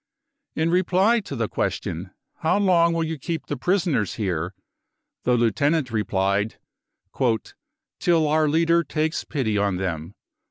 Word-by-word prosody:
In 160 +1 +1
reply 190 +6 +3
to 195 -9 -7
the 115 -3 -1
question: 85 -2 -2
€t - - -19 0.3
How 160 +4 +2
long 175 -4 +4
will 165 0 0
you 160 -1 -4
keep 165 +4 -4
the 145 - -3
prisoners 165 - 0
here? 90 -3 -2 0.3
" - - -58
the 125 0 +3
Lieutenant 130 +5 +1
replied: 100 0 0 0.8
" - - -16
Till 165 -3 +3
our 155 0 +3
leader 165 +2 +3
takes 155 +1 -1
pity 110 -9 -1
on 100 -2 +1
them." 85 -1 -4
145 Hz, 150 wpm, -24 LUFS, 105-165 Hz, 0.8 s, long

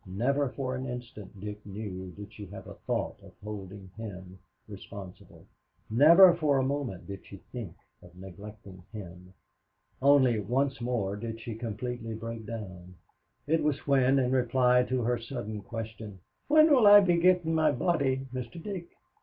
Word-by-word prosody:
Never 130 +9 0
for 130 0 -4
an 130 +1 -4
instant, 120 -5 -8
Dick 105 +1 -7
knew, 95 -2 -6
did 100 +4 -11
she 105 -2 -9
have 95 +1 -10
a - - -9
thought - - -3
of - - -15
holding 100 -2 -8
him 95 -4 -8 0.3
responsible. 100 -2 -11 0.5
Never 170 - +8
for 155 -5 +1
a 135 - +2
moment 135 -8 -3
did 100 -1 -8
she 100 - -11
think 115 -9 -7 0.3
of 90 0 -16
neglecting 95 0 -11
him. 90 -3 -10 0.7
Only 130 -5 +5
once 130 +4 -1
more 115 -5 -1
did 115 +1 -6
she 115 0 -6
completely 115 +1 -5
break 115 0 -7
down. 95 -5 -8 0.5
It 160 +2 +1
was 150 -2 -1
when, 135 -1 +3
in 130 -2 +1
reply 125 0 +3
to 130 -1 -1
her 120 +1 0
sudden 110 -2 -6
question, 110 -2 -7 0.3
"When 310 +1 +6
will 245 -6 +6
I 205 0 +10
be 175 -3 +3
gettin' 175 -2 +3
my 155 -1 +3
body, 135 -2 0
Mr. 130 +5 -6
Dick!" 180 -1 -6
115 Hz, 160 wpm, -29 LUFS, 100-135 Hz, 0.7 s, I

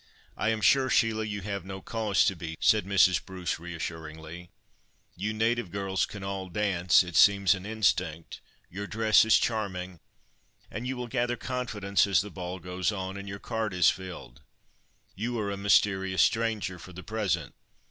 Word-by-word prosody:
"I 110 - 0
am 110 -1 -1
sure, 130 +5 +4
Sheila, 110 -2 +2
you 100 -1 -4
have 100 -1 -4
no 95 +1 -7
cause 110 -1 +1
to 95 - +1
be," 80 -2 -7
said 105 -3 +3
Mrs. 95 -2 +4
Bruce, 90 -5 -4
reassuringly; 80 0 -7 0.7
"you 105 +4 -2
native 115 -1 0
girls 95 0 -1
can 100 -2 -9
all 95 -1 -4
dance—it 90 -2 +2
seems 100 -1 +6
an 95 0 -7
instinct; 90 -7 -1 0.3
your 100 +3 -6
dress 110 0 +4
is 110 - +6
charming, 95 -6 -2 0.7
and 115 +4 -5
you 130 0 -3
will 125 - -4
gather 120 0 -1
confidence 105 -7 0
as 100 - +3
the 105 +1 -8
ball 90 0 -6
goes 90 +2 -2
on—and 100 0 -5
your 100 - -5
card 110 -2 -3
is 90 -2 +5
filled. 85 -9 -9 0.7
You 115 +4 -3
are 105 -2 -2
a - - -2
mysterious 95 -1 +3
stranger, 110 -5 0
for 90 - -12
the 90 +2 -9
present. 100 - -2
100 Hz, 165 wpm, -28 LUFS, 90-110 Hz, 0.7 s, seems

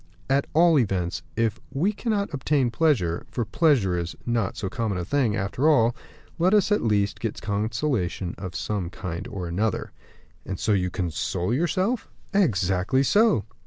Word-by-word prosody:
"At 140 +1 +2
all 165 -2 +6
events, 95 -7 -1
if 115 -1 0
we 165 +10 +1
cannot 205 -5 -2
obtain 135 -2 +1
pleasure 115 - +1
for 120 - -2
pleasure 120 - +2
is 85 0 -4
not 115 -5 -1
so 100 - -3
common 105 0 -2
a 90 - -3
thing, 120 -1 +1
after 110 +9 +1
all 120 -6 +4 0.4
let 185 +5 +4
us, 210 0 +3
at 210 - +3
least, 105 -3 +1
get 115 -3 -3
consolations 105 - -1
of 90 -2 -6
some 100 -5 -2
kind 85 -2 -6
or 95 -4 -5
another." 100 +5 -1 0.5
"And 95 - -5
so - - 0
you 90 -2 +1
console 90 +1 -2
yourself?" 185 - 0 0.2
"Exactly 100 - +2
so." 205 - +4
115 Hz, 160 wpm, -25 LUFS, 95-150 Hz, 0.5 s, all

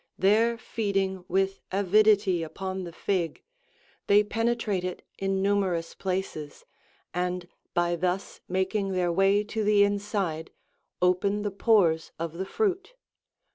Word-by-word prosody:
There 225 +5 +3
feeding 195 -5 -2
with 195 +1 0
avidity 200 -1 +3
upon 185 +3 -4
the 170 - -7
fig, 175 -2 -2 0.6
they 205 +1 +6
penetrate 225 -3 -1
it 180 -1 -4 0.2
in 195 0 0
numerous 190 -4 0
places, 185 -6 -4 0.5
and 180 0 -2 0.3
by 175 0 +2
thus 180 +3 -2
making 190 +2 -1
their 180 -1 +1
way 195 +3 +3
to 220 +1 -3
the 205 -1 +5
inside, 200 -5 -1 0.5
open 195 +3 +2
the 205 - -1
pores 190 -6 +3
of 165 -1 -4
the 190 - -1
fruit. 400 - -1
195 Hz, 125 wpm, -27 LUFS, 180-205 Hz, 0.6 s, they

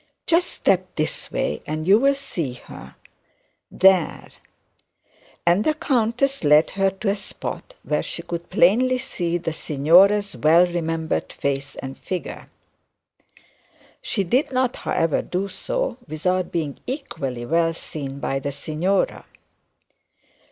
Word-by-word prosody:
just 345 +2 +3
step 185 -1 +1
this 155 0 -2
way 75 - -2
and 155 +2 -3
you'll 255 +8 +5
see 175 - -4
her, 65 - -12 0.7
there 190 -3 +3 0.6
' - - -33
and 175 +4 +4
the 310 - +1
countess 265 - 0
led 150 +1 +5
her 195 0 +2
to 195 +3 -6
a 195 - +2
spot 355 - -6
where - - 0
she - - -5
could 170 0 -6
plainly 250 +8 +4
see 175 -8 -2
the 165 -2 -3
signora's 180 +8 +4
well 165 +4 +5
remembered 165 - -2
face 140 0 -3
and 135 0 -7
figure. 185 -1 -6 1.5
She 200 - -1
did 250 - +1
not 255 -1 +1
however 165 -2 0
do 185 +2 -3
so - - -3
without 180 +4 -1
being 155 -5 -3
equally 135 - -4
well 165 +4 +2
seen 140 -4 -6
by 135 -1 -1
the 140 +1 -3
signora. 155 +7 -1
175 Hz, 130 wpm, -23 LUFS, 155-210 Hz, 1.5 s, you'll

